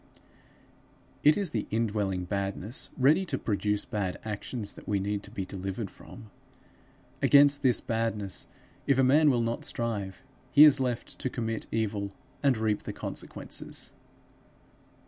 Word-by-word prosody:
It 150 Hz, +1 st, +6 dB
is 195 Hz, -6 st, 0 dB
the 110 Hz, -, -2 dB
indwelling 105 Hz, -4 st, -1 dB
badness, 100 Hz, +4 st, -3 dB
ready 145 Hz, +8 st, +4 dB
to -, -, -1 dB
produce 105 Hz, -1 st, -1 dB
bad 105 Hz, -7 st, -2 dB
actions, 105 Hz, 0 st, -3 dB
that -, -, -14 dB
we 100 Hz, -1 st, +1 dB
need 100 Hz, +1 st, -2 dB
to 105 Hz, -, -10 dB
be 100 Hz, -3 st, -4 dB
delivered 95 Hz, +2 st, -5 dB
from. 110 Hz, -4 st, -13 dB, 0.9 s
Against 145 Hz, 0 st, +6 dB
this 130 Hz, -3 st, +3 dB
badness 110 Hz, -4 st, -2 dB, 0.4 s
if 140 Hz, -, +4 dB
a 135 Hz, -, +4 dB
man 145 Hz, +4 st, +5 dB
will 120 Hz, -4 st, +2 dB
not 115 Hz, 0 st, -2 dB
strive, 105 Hz, -3 st, -3 dB, 0.3 s
he 145 Hz, -, +9 dB
is 145 Hz, -2 st, +7 dB
left 125 Hz, -3 st, -3 dB
to 130 Hz, -, -2 dB
commit 115 Hz, -3 st, -3 dB
evil 105 Hz, -3 st, -2 dB, 0.3 s
and 135 Hz, -4 st, +3 dB
reap 110 Hz, -1 st, 0 dB
the -, -, -6 dB
consequences. -, -, -3 dB
110 Hz, 145 wpm, -29 LUFS, 100-130 Hz, 0.9 s, he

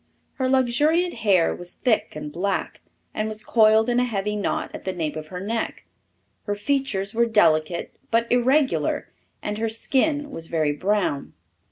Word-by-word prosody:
Her 260 Hz, -1 st, +1 dB
luxuriant 295 Hz, +7 st, +2 dB
hair 200 Hz, -7 st, +2 dB
was 175 Hz, 0 st, -9 dB
thick 225 Hz, -9 st, 0 dB
and 150 Hz, -1 st, -6 dB
black, 195 Hz, +5 st, -2 dB, 0.3 s
and 215 Hz, -, -1 dB
was 215 Hz, 0 st, -2 dB
coiled 220 Hz, 0 st, +4 dB
in 245 Hz, 0 st, +2 dB
a -, -, +3 dB
heavy 210 Hz, -3 st, -2 dB
knot 205 Hz, -, -2 dB
at -, -, -8 dB
the 190 Hz, -, -2 dB
nape 160 Hz, -4 st, -3 dB
of 155 Hz, -1 st, -6 dB
her 180 Hz, +3 st, -6 dB
neck. 220 Hz, +4 st, -3 dB, 0.6 s
Her 205 Hz, -, -1 dB
features 205 Hz, -3 st, -1 dB
were 235 Hz, +1 st, +3 dB
delicate 170 Hz, -6 st, +2 dB, 0.2 s
but 230 Hz, 0 st, +2 dB
irregular, 260 Hz, +4 st, +2 dB, 0.3 s
and 210 Hz, 0 st, -3 dB
her 225 Hz, 0 st, 0 dB
skin 290 Hz, +6 st, 0 dB
was 165 Hz, -10 st, -6 dB
very 155 Hz, -3 st, +1 dB
brown. 185 Hz, -2 st, -1 dB
215 Hz, 165 wpm, -24 LUFS, 185-245 Hz, 0.6 s, coiled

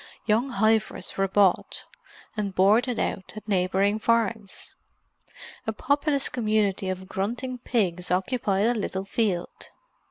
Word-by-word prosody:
Young 230 Hz, +5 st, +2 dB
heifers 220 Hz, -2 st, 0 dB
were 195 Hz, 0 st, +1 dB
bought, 190 Hz, -1 st, +2 dB, 0.5 s
and 200 Hz, -3 st, -3 dB
"boarded 220 Hz, +6 st, +3 dB
out" 190 Hz, -, -3 dB
at 215 Hz, -, -9 dB
neighbouring 195 Hz, +2 st, +1 dB
farms; 225 Hz, -3 st, -1 dB, 0.9 s
a 220 Hz, -, 0 dB
populous 285 Hz, +3 st, +1 dB
community 215 Hz, -5 st, 0 dB
of 185 Hz, 0 st, -5 dB
grunting 245 Hz, +7 st, -3 dB
pigs 185 Hz, -8 st, -1 dB
occupied 195 Hz, +1 st, +1 dB
a 240 Hz, -, +3 dB
little 195 Hz, -3 st, -3 dB
field. 195 Hz, -4 st, -2 dB
210 Hz, 120 wpm, -26 LUFS, 190-230 Hz, 0.9 s, boarded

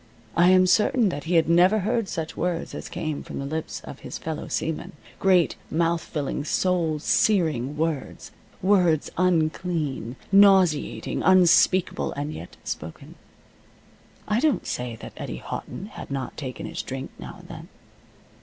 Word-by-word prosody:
I 175 Hz, +2 st, +5 dB
am 185 Hz, 0 st, +6 dB
certain 215 Hz, +4 st, +3 dB
that 145 Hz, -4 st, -5 dB
he 175 Hz, +2 st, 0 dB
had 165 Hz, -, +4 dB
never 175 Hz, +5 st, +5 dB
heard 220 Hz, +2 st, 0 dB
such 160 Hz, -1 st, -4 dB
words 175 Hz, -1 st, -2 dB
as -, -, -7 dB
came 155 Hz, -2 st, -4 dB
from -, -, -8 dB
the 140 Hz, -, -4 dB
lips 160 Hz, +3 st, -4 dB
of -, -, -10 dB
his -, -, -7 dB
fellow 160 Hz, -1 st, -5 dB
seamen 160 Hz, -1 st, -3 dB, 0.3 s
great 185 Hz, -3 st, +3 dB
mouth 165 Hz, +1 st, +1 dB
filling, 145 Hz, -1 st, -3 dB
soul 170 Hz, -1 st, +1 dB
searing 150 Hz, -, +1 dB
words 155 Hz, -3 st, -3 dB, 0.3 s
words 180 Hz, -6 st, +3 dB
unclean, 160 Hz, -7 st, 0 dB, 0.2 s
nauseating, 195 Hz, -6 st, +4 dB
unspeakable, 185 Hz, 0 st, +4 dB
and 145 Hz, +2 st, -4 dB
yet 85 Hz, -, -10 dB
spoken. 80 Hz, +1 st, -7 dB, 1.1 s
I 210 Hz, +2 st, +1 dB
don't 305 Hz, 0 st, +1 dB
say 125 Hz, -2 st, -3 dB
that -, -, -10 dB
Eddie -, -, -5 dB
Houghton 205 Hz, +3 st, -7 dB
had -, -, -8 dB
not 135 Hz, -1 st, -4 dB
taken 130 Hz, -4 st, -6 dB
his -, -, -4 dB
drink 135 Hz, +1 st, -6 dB
now -, -, -8 dB
and -, -, -15 dB
then. -, -, -9 dB
165 Hz, 150 wpm, -25 LUFS, 150-185 Hz, 1.1 s, am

